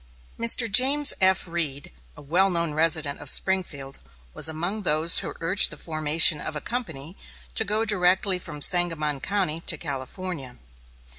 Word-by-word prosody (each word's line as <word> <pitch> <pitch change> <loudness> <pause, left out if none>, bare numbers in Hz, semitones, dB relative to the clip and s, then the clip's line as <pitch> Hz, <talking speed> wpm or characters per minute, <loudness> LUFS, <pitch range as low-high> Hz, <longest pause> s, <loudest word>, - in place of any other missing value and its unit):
Mr. 230 0 +3
James 270 +7 +2
F. 190 0 +1
Reed, 155 - -5 0.3
a - - -13
well 180 +7 +1
known 170 -3 -3
resident 155 -2 +1
of 145 - 0
Springfield, 145 -9 0 0.3
was - - +2
among 175 +7 -5
those 160 -2 +3
who - - -8
urged 185 +4 +4
the - - -9
formation 155 -1 +2
of 155 - -6
a - - -4
company 180 - -7 0.4
to - - +1
go 215 +2 -2
directly 185 -2 +1
from 150 -4 -4
Sangamon 165 -5 +1
County 185 -1 -2
to - - +4
California. 140 -1 -7
170 Hz, 150 wpm, -23 LUFS, 150-190 Hz, 0.4 s, urged